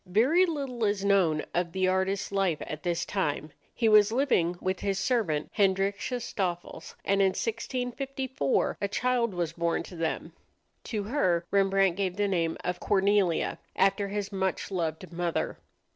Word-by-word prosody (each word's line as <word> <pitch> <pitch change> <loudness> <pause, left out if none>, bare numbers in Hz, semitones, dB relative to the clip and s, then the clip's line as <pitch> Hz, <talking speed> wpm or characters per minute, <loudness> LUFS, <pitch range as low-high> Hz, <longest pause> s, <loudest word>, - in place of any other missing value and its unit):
Very 265 - +4
little 275 -7 -3
is 205 -1 +1
known 180 -6 +3
of 170 -1 -1
the 185 -1 +1
artist's 190 +2 0
life 195 -5 +1
at 155 0 -6
this 175 -1 -1
time. 155 -6 -2 0.2
He 230 - +2
was 215 -1 +6
living 225 -10 +2
with 185 0 -2
his 195 -1 -1
servant, 195 -8 0
Hendrickje 200 +4 +1
Stoffels, 175 -6 -4
and 195 0 +2
in 195 - +5
1654 250 - -2
a 200 - +1
child 235 -1 0
was 170 -2 -2
born 170 0 0
to 180 - -11
them. 165 -1 -3 0.5
To 215 -3 -2
her 185 -8 +1
Rembrandt 195 -2 +3
gave 190 -3 -1
the 205 0 +2
name 170 -4 0
of 180 0 -2
Cornelia, 195 -3 +2 0.2
after 195 +1 +2
his 205 0 -3
much 190 0 -2
loved 170 0 -3
mother. 170 -1 -2
195 Hz, 155 wpm, -28 LUFS, 175-210 Hz, 0.5 s, was